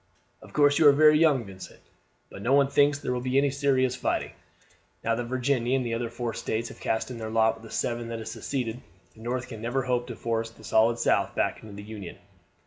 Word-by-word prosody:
"Of - - -14
course 145 -1 +4
you 155 - +7
are - - +10
very 150 +1 +6
young, 145 -7 +3
Vincent; 95 -1 -11 0.5
but - - -9
no 125 +6 +1
one 140 -1 +4
thinks 145 +1 +3
there 125 - -3
will 125 - -2
be 130 +1 0
any 140 0 +3
serious 130 -2 +1
fighting. - - -1 0.7
Now 115 - +1
that 120 +1 -2
Virginia 130 0 0
and 130 - -2
the 115 - -2
other 115 0 -2
four 120 0 -4
States 115 +1 -3
have - - -12
cast 110 +3 -2
in 120 - -7
their 110 -1 -5
lot 110 0 +3
with 110 0 -15
the 115 - -11
seven 120 +1 -2
that 115 0 -4
have 110 - -7
seceded, 125 -3 -4 0.3
the 110 - -17
North 125 +2 -3
can 110 -3 -9
never 120 +3 -1
hope 125 -1 -1
to 120 - -6
force 115 0 -2
the 110 -1 -18
solid 115 +2 +3
South - - +1
back - - 0
into 105 -2 -11
the 100 - -8
Union. 105 -4 -8
120 Hz, 235 wpm, -27 LUFS, 115-135 Hz, 0.7 s, are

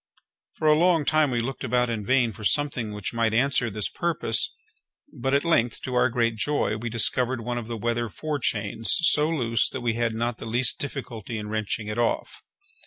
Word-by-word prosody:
For 155 - -2
a 155 - +7
long 165 -1 +3
time 155 0 +3
we 120 -2 0
looked 130 +3 -5
about 125 0 +1
in 110 -2 -3
vain 125 0 +2
for 110 +1 -11
something 125 -2 +1
which 105 +1 -4
might 115 -1 +1
answer 125 -1 +2
this 105 -1 -2
purpose; 160 -10 0 0.6
but 135 +1 -1
at 140 - +2
length, 120 -8 +1
to 130 - -4
our 125 +1 +3
great 115 -1 0
joy, 145 -2 0
we 115 +2 -4
discovered 120 +2 +1
one 120 +1 -3
of 115 - -8
the 115 -1 -4
weather 120 +1 -1
forechains 115 -6 -2
so 155 -2 +3
loose 115 -9 +1
that 130 - -6
we 120 -2 0
had 115 -1 -1
not 120 +1 -2
the - - -7
least 120 +2 0
difficulty 120 -5 -5
in 105 -1 -6
wrenching 110 0 -2
it 105 +2 -3
off. 120 - -1
120 Hz, 200 wpm, -25 LUFS, 110-135 Hz, 0.6 s, a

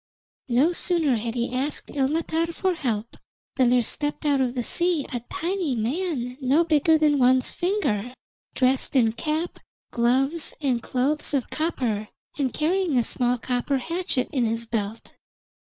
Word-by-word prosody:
No 260 +8 +4
sooner 335 -7 +1
had 230 +2 -4
he 240 +1 -2
asked 275 +4 -2
Ilmatar 320 +4 0
for 375 -1 +1
help 235 -8 -3 0.4
than 255 -3 +4
there 245 0 +4
stepped 295 +6 -3
out 285 -2 +3
of 255 -1 0
the 245 - -1
sea 345 +1 +1
a 245 - -1
tiny 360 -5 -1
man 250 +1 -2
no 275 +6 +3
bigger 320 0 +3
than 300 -2 +3
one's 255 0 +4
finger, 300 - -1 0.4
dressed 260 +1 +1
in 230 -4 +4
cap, 310 +7 -3 0.3
gloves, 265 +7 +1
and 260 -6 0
clothes 285 +5 0
of 265 - -2
copper, 245 -10 -1 0.3
and 270 -4 0
carrying 335 0 +1
a 240 - +4
small 245 +2 +1
copper 250 +3 -1
hatchet 335 -1 -2
in 260 -4 +1
his 230 0 -1
belt. 220 -1 -4
270 Hz, 150 wpm, -25 LUFS, 245-320 Hz, 0.4 s, No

